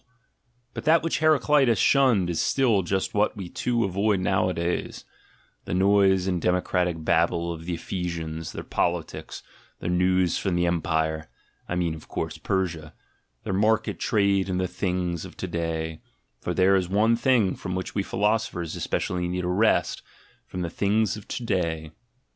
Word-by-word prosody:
ASCETIC 125 - -40
IDEALS 120 0 -44 0.2
in - - -46
But - - -6
that 160 +1 +5
which 165 - 0
Heracleitus 150 -6 +4
shunned 120 -6 +3
is 85 - 0
still 120 -7 +2
just 95 +2 -2
what 105 +1 +1
we 95 -3 -6
too 120 +3 0
avoid 100 +2 +1
nowadays: 90 -2 -1 0.6
the - - -2
noise 95 -1 +4
and 90 -3 -1
democratic 90 -2 0
babble 85 +1 +1
of 80 0 -9
the 90 0 -2
Ephesians, 80 -3 -4
their - - -6
politics, 85 -2 -3 0.3
their 85 - -3
news 90 0 +2
from 95 -3 -1
the 85 0 +2
"empire" 80 -3 -1 0.4
(I 85 - -1
mean, 85 -2 0
of 80 -1 -11
course, - - -4
Persia), 85 -5 -2 0.5
their - - -3
market 110 +3 +1
trade 100 -3 +2
in 90 - -1
"the 95 0 0
things 90 -3 -2
of 95 - -11
to 95 - -4
day" 80 -2 -3 0.2
— - - -48
for - - -3
there 95 +1 +4
is 90 -2 0
one 110 +4 +3
thing 120 -5 +2
from 90 0 -5
which 95 - -4
we 100 - 0
philosophers 100 -5 -1
especially 90 -1 -2
need 90 +1 -2
a - - -1
rest 105 +5 +2 0.2
— - - -32
from 90 - -5
the 85 - -4
things 105 +1 +1
of 105 - -11
"to 120 - -4
day." 85 -7 -1
90 Hz, 175 wpm, -25 LUFS, 85-105 Hz, 0.6 s, that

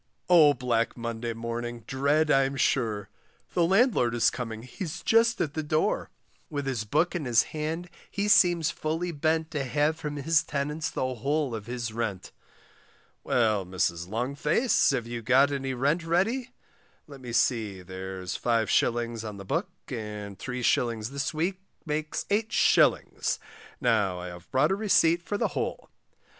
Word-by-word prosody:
Oh, 155 -5 +7
black 120 -2 0
Monday 115 0 -3
morning 115 +1 -5
dread 145 +4 +1
I'm 135 0 +3
sure, 110 -6 0 0.5
The 175 - +3
landlord 190 - +3
is 120 - +3
coming, 115 -3 -5
he's 155 +6 -6
just 230 +1 +3
at 145 - -1
the 155 - -2
door; 155 +1 0 0.4
With 145 -2 -3
his 125 -5 -2
book 155 +11 +1
in 165 -5 -2
his 120 -2 +4
hand 160 +3 -3 0.2
he 200 +1 -2
seems 175 -5 +5
fully 165 +3 -2
bent 160 +1 0
To 150 -4 -2
have 145 +4 +1
from 150 -2 -5
his 150 +2 +2
tenants 150 +2 -2
the 130 0 -2
whole 140 +3 -1
of 110 -1 -6
his 120 -2 -4
rent. 110 -5 -3 0.9
Well, 110 -5 +2
Mrs. 90 -2 -1
Longface, 140 - +1
have 130 -4 0
you 120 0 -5
got 130 +5 +4
any 135 -2 -2
rent 145 +7 +1
ready 210 +10 0 0.6
let 140 -3 -12
me 125 -2 -7
see, 110 -6 0
there's 95 0 -6
5s. 115 0 +1
on 105 -2 -6
the 100 - -9
book, - - -1 0.2
and 105 -3 -6
3s. 120 -3 0
this 140 -1 -2
week 180 +5 -2 0.2
makes 155 0 -2
8s., 220 +3 +2 0.4
now 110 -8 +2
I 90 0 -6
have 90 0 -12
brought 135 +6 +2
a - - +3
receipt 185 -5 +3
for 205 +4 -3
the - - 0
whole. - - -4
135 Hz, 155 wpm, -27 LUFS, 115-155 Hz, 0.9 s, Oh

